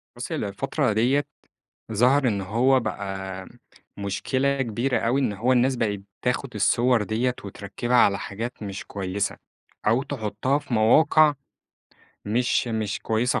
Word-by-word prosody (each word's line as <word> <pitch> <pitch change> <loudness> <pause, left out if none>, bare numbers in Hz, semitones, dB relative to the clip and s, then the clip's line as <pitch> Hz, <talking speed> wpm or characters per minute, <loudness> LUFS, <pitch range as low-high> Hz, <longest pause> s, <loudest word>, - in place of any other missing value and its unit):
بُص، - - -6
هي - - 0
الفترة 125 +5 -1
ديّة 130 +7 +2 0.7
ظهر 125 +4 +4
إن 100 -3 -1
هو 120 +7 +2
بقى 95 -3 -5 0.5
مشكلة 130 +7 -1
كبيرة 120 +3 0
أوي 125 +4 +1
إن 125 -6 0
هو 115 +6 +1
الناس 130 +1 +3
بقِت 105 -4 -1 0.2
بتاخُد 125 0 -1
الصور 115 +3 +3
ديّة، 115 +4 0
وتركّبها 105 +5 -2
على 100 -4 +5
حاجات 115 +5 -6
مش 100 0 -6
كويسة، 100 0 -3 0.5
أو 115 +5 +3
تحُطّها 135 +2 -1
في 125 - -5
مواقع 150 +7 +5 0.9
مش 120 +3 +1
مش 110 -2 -2
كويسة 115 +3 0
115 Hz, 135 wpm, -24 LUFS, 100-130 Hz, 0.9 s, على